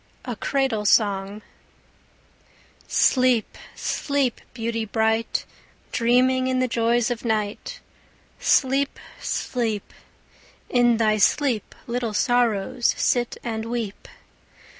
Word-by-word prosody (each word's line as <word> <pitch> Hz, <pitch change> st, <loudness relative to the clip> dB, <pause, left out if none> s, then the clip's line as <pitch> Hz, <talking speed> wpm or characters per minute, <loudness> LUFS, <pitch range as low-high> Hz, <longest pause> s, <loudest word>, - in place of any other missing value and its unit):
A 245 Hz, -3 st, -4 dB
CRADLE 260 Hz, -3 st, -1 dB
SONG 200 Hz, 0 st, +2 dB, 1.4 s
Sleep, 255 Hz, -4 st, +2 dB, 0.2 s
sleep, 280 Hz, -4 st, -1 dB
beauty 230 Hz, -1 st, -3 dB
bright, 220 Hz, +1 st, 0 dB, 0.5 s
Dreaming 255 Hz, +2 st, +3 dB
in 260 Hz, 0 st, 0 dB
the 255 Hz, 0 st, +2 dB
joys 235 Hz, +1 st, +1 dB
of 235 Hz, -, -4 dB
night; 220 Hz, -, -2 dB, 0.6 s
Sleep, 275 Hz, +1 st, +2 dB, 0.2 s
sleep; 225 Hz, -5 st, -2 dB, 0.8 s
in 240 Hz, -2 st, +3 dB
thy 215 Hz, -1 st, +2 dB
sleep 240 Hz, +1 st, +1 dB
Little 235 Hz, -3 st, -3 dB
sorrows 240 Hz, 0 st, +1 dB
sit 240 Hz, -1 st, +1 dB
and 225 Hz, -2 st, -3 dB
weep. 230 Hz, -3 st, -4 dB
235 Hz, 95 wpm, -23 LUFS, 220-255 Hz, 1.4 s, Dreaming